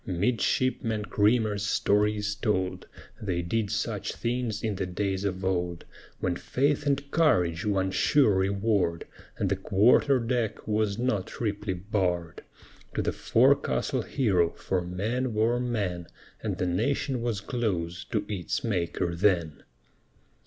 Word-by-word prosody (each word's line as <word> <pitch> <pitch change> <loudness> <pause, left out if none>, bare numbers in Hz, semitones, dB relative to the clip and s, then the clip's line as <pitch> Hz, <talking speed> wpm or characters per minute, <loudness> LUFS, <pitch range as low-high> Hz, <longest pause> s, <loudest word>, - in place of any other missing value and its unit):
Midshipman 110 +3 0
Creamer's 105 -1 +2
story 105 +1 +2
is 105 0 -1
told 105 -4 -1 0.3
They 90 -4 -1
did 105 +4 -1
such 110 0 -2
things 120 -3 -2
in 110 -2 0
the 95 -1 -3
days 95 +1 -2
of 95 -1 -2
old, 90 -2 -1 0.3
When 90 -1 0
faith 145 +6 0
and 140 0 0
courage 90 - +2
won 95 -2 +1
sure 130 +2 +4
reward, 95 -2 +1 0.3
And 100 - 0
the 100 - +1
quarter 110 +8 +4
deck 115 -2 -2
was 105 -1 0
not 115 -6 0
triply 105 -3 -3
barred, 90 -3 -2 0.5
To - - 0
the - - 0
forecastle - - +2
hero; 95 -10 +1
for 95 -1 -2
men 110 +8 -2
were 115 +3 +2
men, 100 -9 -2 0.3
And - - -2
the - - -1
Nation 120 +7 0
was 115 -4 -1
close 95 -7 -2
to 105 -2 -2
its 95 -5 -3
Maker 85 -5 -1
then. 85 -4 +1
105 Hz, 135 wpm, -27 LUFS, 90-115 Hz, 0.5 s, sure